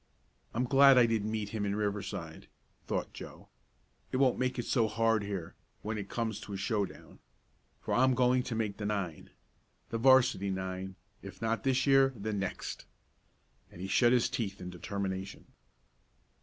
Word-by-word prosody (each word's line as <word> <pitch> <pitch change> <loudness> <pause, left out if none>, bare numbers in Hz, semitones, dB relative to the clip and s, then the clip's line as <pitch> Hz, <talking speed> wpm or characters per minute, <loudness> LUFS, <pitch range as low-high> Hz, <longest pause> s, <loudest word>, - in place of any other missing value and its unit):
"I'm 120 - +1
glad 135 +1 +6
I 125 - +7
didn't 110 -2 0
meet 110 -2 -3
him 110 -1 -3
in 100 0 -1
Riverside," 100 -6 -4 0.4
thought - - -2
Joe. - - -11 0.6
"It - - 0
won't 130 -2 +3
make 130 0 0
it 120 - -2
so 115 -4 +2
hard 115 0 +2
here 100 -5 -5 0.3
when 110 0 -3
it 100 - -7
comes 110 -3 -2
to 100 - -8
a - - -3
showdown. 100 0 -3 0.6
For - - -3
I'm 130 0 +4
going 125 0 +3
to 120 -2 -4
make 110 -3 -2
the 105 - -3
nine! 95 -7 -3 0.6
The 115 - -2
'varsity 125 -6 +4
nine; 95 0 -4 0.3
if 95 -2 -10
not 115 0 -1
this 130 -1 +2
year, 135 -1 +5
then 105 -1 -3
next!" 95 - -5 0.9
and - - -13
he 95 - -4
shut 120 +5 +4
his 125 -2 +3
teeth 110 -5 -3
in 90 0 -7
determination. 95 +1 -5
110 Hz, 170 wpm, -31 LUFS, 100-125 Hz, 0.9 s, I